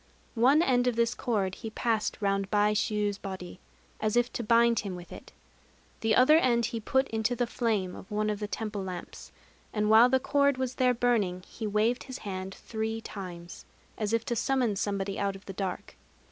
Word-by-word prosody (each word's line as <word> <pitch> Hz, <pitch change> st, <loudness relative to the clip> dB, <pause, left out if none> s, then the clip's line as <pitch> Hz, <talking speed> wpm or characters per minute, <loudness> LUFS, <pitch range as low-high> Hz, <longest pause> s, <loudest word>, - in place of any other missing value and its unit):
One 280 Hz, +7 st, +6 dB
end 250 Hz, -4 st, +2 dB
of 245 Hz, -, +1 dB
this 230 Hz, 0 st, +2 dB
cord 200 Hz, -6 st, -1 dB
he 225 Hz, -, -6 dB
passed 220 Hz, 0 st, -1 dB
round 195 Hz, -1 st, 0 dB
Baishû's 210 Hz, 0 st, +1 dB
body, 185 Hz, -2 st, -7 dB, 0.4 s
as 215 Hz, +1 st, 0 dB
if 240 Hz, 0 st, +1 dB
to 235 Hz, -, -3 dB
bind 235 Hz, 0 st, +4 dB
him 195 Hz, -3 st, -4 dB
with 175 Hz, -1 st, -11 dB
it. -, -, -11 dB, 0.7 s
The 225 Hz, -1 st, +2 dB
other 280 Hz, +5 st, +6 dB
end 235 Hz, -5 st, +2 dB
he 235 Hz, 0 st, -3 dB
put 265 Hz, +5 st, +1 dB
into 225 Hz, +2 st, 0 dB
the 245 Hz, -, 0 dB
flame 220 Hz, -6 st, -1 dB
of 190 Hz, -, -11 dB
one 210 Hz, 0 st, 0 dB
of 205 Hz, -, -4 dB
the 210 Hz, -, -3 dB
temple 210 Hz, -2 st, -4 dB
lamps; 185 Hz, -2 st, -8 dB, 0.4 s
and 210 Hz, 0 st, +1 dB
while 230 Hz, +3 st, +8 dB
the 265 Hz, +1 st, +3 dB
cord 280 Hz, 0 st, +2 dB
was 260 Hz, -1 st, -2 dB
there 250 Hz, -1 st, +4 dB
burning, 210 Hz, -7 st, +1 dB
he 220 Hz, -, -5 dB
waved 215 Hz, +4 st, +1 dB
his 260 Hz, -2 st, -7 dB
hand 190 Hz, -1 st, -5 dB
three 220 Hz, 0 st, -4 dB
times, 180 Hz, -5 st, -8 dB, 0.3 s
as 210 Hz, -1 st, -2 dB
if 230 Hz, 0 st, 0 dB
to 240 Hz, -, -1 dB
summon 250 Hz, -3 st, +1 dB
somebody 195 Hz, 0 st, -2 dB
out 200 Hz, -1 st, -1 dB
of 195 Hz, -, -13 dB
the 195 Hz, -, -7 dB
dark. 190 Hz, -1 st, -5 dB
220 Hz, 195 wpm, -29 LUFS, 200-240 Hz, 0.7 s, while